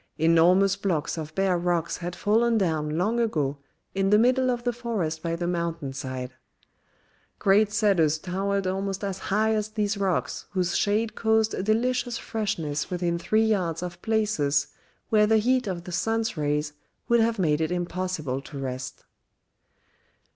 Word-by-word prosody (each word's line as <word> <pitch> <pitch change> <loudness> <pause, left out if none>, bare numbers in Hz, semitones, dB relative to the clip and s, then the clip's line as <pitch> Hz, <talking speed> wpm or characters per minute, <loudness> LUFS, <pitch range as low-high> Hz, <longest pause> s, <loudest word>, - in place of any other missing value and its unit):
Enormous 175 +5 +4
blocks 190 -7 -1
of 155 -1 -7
bare 190 -2 +2
rocks 170 -1 0
had 175 0 -5
fallen 225 +4 +2
down 155 -5 0
long 215 +7 +1
ago 150 -11 0 0.3
in 195 0 +1
the 210 - +6
middle 255 +3 +3
of 240 -1 -1
the 245 0 0
forest 210 -10 -3
by 165 0 -2
the 175 +1 -3
mountain 170 -5 -2
side. 130 -1 -5 1.0
Great 205 +2 +3
cedars 195 -8 +3
towered 195 +3 -2
almost 195 +1 -2
as 195 -1 -3
high 215 +3 +1
as 215 -1 -1
these 210 -1 -1
rocks 175 -9 -1
whose 180 -2 0
shade 215 +2 +1
caused 220 -1 +2
a - - -2
delicious 240 +3 0
freshness 165 -9 -3
within 175 -1 -1
three 215 +5 +2
yards 180 -6 0
of 175 0 -7
places 205 -11 +1 0.4
where 210 -1 +4
the 220 +1 +4
heat 250 +2 +2
of 175 -3 -3
the 180 - -8
sun's 225 +5 -1
rays 150 -1 -1 0.3
would 235 0 +4
have 225 0 +2
made 155 -5 +1
it 160 - 0
impossible 175 -6 -2
to 140 +1 -10
rest. 130 -1 -5
185 Hz, 160 wpm, -26 LUFS, 165-215 Hz, 1.0 s, the